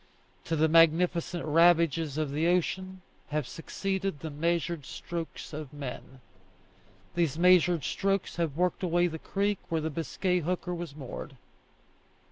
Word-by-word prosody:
To 165 Hz, -, -1 dB
the 160 Hz, +1 st, +3 dB
magnificent 165 Hz, +1 st, +3 dB
ravages 165 Hz, -2 st, +3 dB
of 155 Hz, -3 st, -1 dB
the 155 Hz, +4 st, +1 dB
ocean 185 Hz, +1 st, 0 dB, 0.2 s
have 150 Hz, -3 st, -2 dB
succeeded 190 Hz, 0 st, -3 dB
the 160 Hz, -, -5 dB
measured 170 Hz, +1 st, -1 dB
strokes 170 Hz, +3 st, -6 dB
of 150 Hz, -2 st, -6 dB
men. 135 Hz, -2 st, -8 dB, 0.9 s
These 165 Hz, -4 st, 0 dB
measured 175 Hz, -2 st, +5 dB
strokes 195 Hz, +2 st, -1 dB
have 160 Hz, -4 st, -1 dB
worked 180 Hz, 0 st, +1 dB
away 175 Hz, -1 st, +2 dB
the 160 Hz, -2 st, -3 dB
creek 200 Hz, +3 st, -1 dB
where 165 Hz, -, +1 dB
the 160 Hz, +1 st, -2 dB
Biscay 180 Hz, +4 st, -1 dB
hooker 180 Hz, +2 st, -2 dB
was 170 Hz, -4 st, -6 dB
moored. 135 Hz, -1 st, -7 dB
165 Hz, 135 wpm, -29 LUFS, 155-180 Hz, 0.9 s, measured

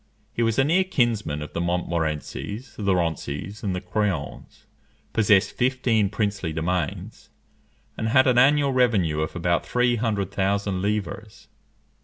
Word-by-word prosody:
He -, -, -2 dB
was 115 Hz, -1 st, +1 dB
a 135 Hz, -, +5 dB
near 170 Hz, +7 st, +3 dB
kinsman 115 Hz, -, 0 dB
of 75 Hz, -, -10 dB
the 85 Hz, -, -2 dB
Montmorencys, 85 Hz, -, -3 dB
the 100 Hz, -3 st, +1 dB
Roncys, 85 Hz, +3 st, -3 dB
and 95 Hz, -3 st, -2 dB
the 90 Hz, -, -4 dB
Craons; 90 Hz, -5 st, -3 dB, 0.5 s
possessed 105 Hz, -2 st, +4 dB
fifteen 125 Hz, -5 st, +1 dB
princely 100 Hz, -5 st, -2 dB
domains, 80 Hz, 0 st, -3 dB, 0.7 s
and 110 Hz, -, -1 dB
had 130 Hz, +3 st, +5 dB
an 125 Hz, -1 st, +4 dB
annual 140 Hz, +2 st, +4 dB
revenue 105 Hz, -12 st, +2 dB
of 80 Hz, -, -3 dB
about 85 Hz, 0 st, 0 dB
three 125 Hz, -1 st, +1 dB
hundred 105 Hz, -4 st, -1 dB
thousand 100 Hz, -1 st, -1 dB
livres. 105 Hz, +1 st, -4 dB
100 Hz, 140 wpm, -24 LUFS, 90-120 Hz, 0.7 s, a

